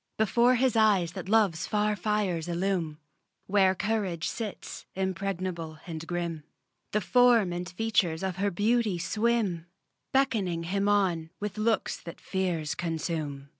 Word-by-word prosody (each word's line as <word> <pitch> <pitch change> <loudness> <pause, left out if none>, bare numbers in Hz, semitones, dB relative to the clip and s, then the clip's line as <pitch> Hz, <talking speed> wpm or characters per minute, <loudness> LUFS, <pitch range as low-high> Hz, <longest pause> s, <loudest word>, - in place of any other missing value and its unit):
Before 235 +4 +4
his 255 -1 +2
eyes 205 -6 +4
that 185 - -7
love's 200 -7 +3
far 210 0 +1
fires 190 -4 -1
illume 175 -3 -1 0.5
Where 190 -1 +3
courage 200 -6 -1
sits, 220 -4 -6
impregnable 185 -4 -3
and 165 -1 -6
grim 170 -3 -3 0.5
The 210 - +1
form 235 -5 +4
and 175 +1 -4
features 185 -4 0
of 190 -2 -2
her 200 +1 +1
beauty 210 +1 +1
swim, 200 -1 0 0.4
Beckoning 215 -11 +1
him 200 +4 0
on 180 -6 +1
with 210 0 -4
looks 220 +1 +1
that 170 - -10
fears 175 -6 -1
consume. 155 -4 -3
190 Hz, 130 wpm, -28 LUFS, 170-210 Hz, 0.5 s, Before